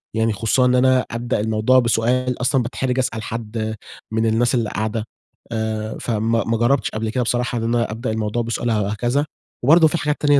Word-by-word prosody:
يعني 110 0 +1
خصوصًا 115 +5 +2
إن 125 0 +3
أنا 130 0 +3
أبدأ 120 +1 -2
الموضوع 110 +4 +3
بسؤال، 125 +2 +1
أصلًا 125 0 +2
باتحرج 125 +2 -2
أسأل 115 -3 -2
حد 110 -1 -4 0.4
من 110 0 +1
الناس 115 +3 +2
اللي 115 -3 0
قاعدة، 110 +1 -2 0.5
آآ 110 -1 -3
فما 115 -1 0
ما 115 0 0
جربتش 120 +4 +2
قبل 110 0 -3
كده 125 +2 0
بصراحة 120 +1 -1
إن 115 - -2
أنا 115 -1 0
أبدأ 115 +1 -3
الموضوع 110 +1 -1
بسؤال 115 +1 -2
أو 105 -3 +1
هكذا. 120 +7 0 0.4
وبرضه 160 +5 +6
في 170 - -1
حاجات 150 -2 0
تانية 145 -1 +5
115 Hz, 190 wpm, -21 LUFS, 110-125 Hz, 0.5 s, وبرضه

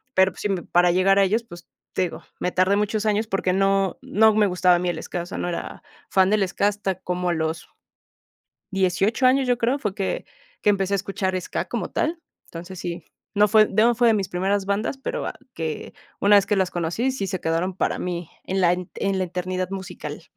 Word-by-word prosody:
pero, 190 0 +5
pues - - -10
sí 205 - -1
me 190 -3 0
para 175 0 +3
llegar 190 +2 +3
a - - +6
ellos, 220 +5 +1
pues, 175 -6 -13 0.3
te - - +1
digo, 175 - -4 0.2
me 180 - -1
tardé 185 +2 +3
muchos 210 +1 0
años 215 +1 +1
porque 190 -2 0
no 195 -1 +2
no 220 +1 +4
me 215 -1 +4
gustaba 180 -1 +3
a - - +1
mí 180 0 -1
el - - -3
Ska, 175 - -4
o - - -9
sea, - - -6
no 175 - -2
era 170 - -5 0.3
fan 190 -1 +4
del 210 -3 +3
Ska, 200 +2 +1
hasta 205 -2 -1
como 180 0 -2
a 175 - +2
los 160 0 -2 1.1
18 195 +6 +1
años, 265 0 +3
yo 245 - +3
creo, 245 +5 +1
fue 210 -7 -2
que 195 -2 -2 0.4
que 210 - +4
empecé 195 0 0
a - - +1
escuchar 195 -1 -2
ska, - - -3
como - - -3
tal, 330 +1 -1 0.2
entonces, 175 +2 -9
sí, 175 -1 -5 0.3
no 205 +1 +5
fue 215 -1 +6
no 225 +4 +3
fue 240 0 +3
de - - +4
mis 195 -2 -2
primeras 195 +2 0
bandas, 205 +7 -1
pero 270 - -4
va - - -3 0.2
que, 160 -2 -4 0.3
una 205 0 +7
vez 195 - +3
que 210 - +2
las 185 -1 +1
conocí, 175 +10 -1
sí 200 -7 -3
se 185 -1 -3
quedaron 170 +3 -1
para - - -1
mí, 175 -2 -4 0.2
en 190 +1 -1
la 175 -1 +5
en 185 +2 -3
la - - +1
eternidad 185 +1 -3
musical. 175 -5 -6
190 Hz, 225 wpm, -23 LUFS, 180-210 Hz, 1.1 s, una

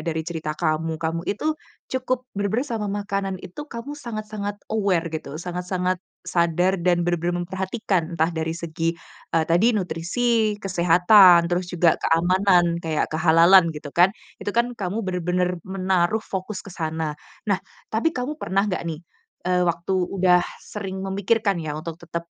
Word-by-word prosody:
dari 160 -1 -2
cerita 160 -2 -4
kamu, 160 -1 0
kamu 165 +1 -2
itu 300 +10 0 0.4
cukup 255 -1 -1
bener-bener 205 +6 -1
sama 225 -6 -3
makanan 195 -1 -2
itu 185 +8 -9
kamu 240 +4 -6
sangat-sangat 215 -6 -5 0.2
aware 195 -6 +1
gitu, 155 -2 -5
sangat-sangat 180 +1 -2 0.2
sadar 175 +1 +1
dan 175 0 +2
benar-benar 175 0 0
memperhatikan, 190 -2 -2
entah 160 +2 +2
dari 160 0 -2
segi, 165 0 -2 0.4
eee, 160 - +3
tadi 200 +9 +3
nutrisi, 210 +5 0
kesehatan, 180 -1 +6
terus 175 +1 -1
juga 175 -2 +3
keamanan, 175 0 +3
kayak 160 -2 0
kehalalan 165 +3 +6
gitu 145 -1 -8
kan, 175 +2 +6 0.3
itu - - -4
kan 235 +4 +1
kamu 205 0 -3
bener-bener 180 -1 -1
menaruh 190 +2 +1
fokus 190 +1 -5
ke 195 - -10
sana. 160 -2 -2 0.3
Nah, 200 -3 +1 0.3
tapi 245 +9 +1
kamu 275 +5 -3
pernah 195 +3 +1
enggak 200 -3 -1
nih, 165 +1 -6 0.4
eee, 180 0 +2
waktu 170 +2 -2
udah 185 -1 +3 0.2
sering 190 -2 -5
memikirkan 200 0 +1
ya, 150 -2 -4
untuk 165 +2 -7
tetap 170 0 -5
180 Hz, 145 wpm, -23 LUFS, 170-200 Hz, 0.4 s, kesehatan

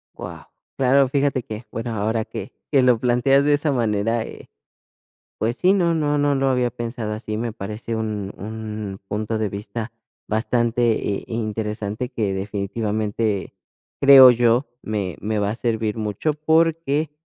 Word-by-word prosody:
Guau, - - -8 0.3
claro. 135 +1 +4
Fíjate 135 -1 0
que 110 +2 -7
bueno, 115 +1 -4
ahora 110 +1 -1
que - - -7 0.2
que 135 - +5
lo 125 -2 +4
planteas 125 +3 +3
de 145 - +4
esa 145 +1 +1
manera, 115 -2 0
eh, - - -11 0.9
pues 115 +2 -1
sí, 185 +2 +4
no 175 -4 +2
no 150 -2 +1
no 145 0 +2
lo 135 0 +1
había 125 -2 +2
pensado 115 -2 -4
así. 110 0 -4
Me 115 0 -3
parece 110 +2 -5
un 105 -3 -3
un 105 -2 -6
punto 110 +2 -2
de 110 -1 -1
vista 105 +3 -6 0.4
bastante, 115 -1 +1
eh, - - -16
interesante 110 0 -3
que 110 -7 -1
definitivamente, 105 +1 -2 0.5
creo 135 -2 +10
yo, 120 +2 +3 0.2
me 100 -5 -3
me 110 0 -1
va 100 0 0
a - - -4
servir 115 -2 -1
mucho 110 +8 -1
porque, 160 -1 +1
115 Hz, 155 wpm, -22 LUFS, 105-130 Hz, 0.9 s, creo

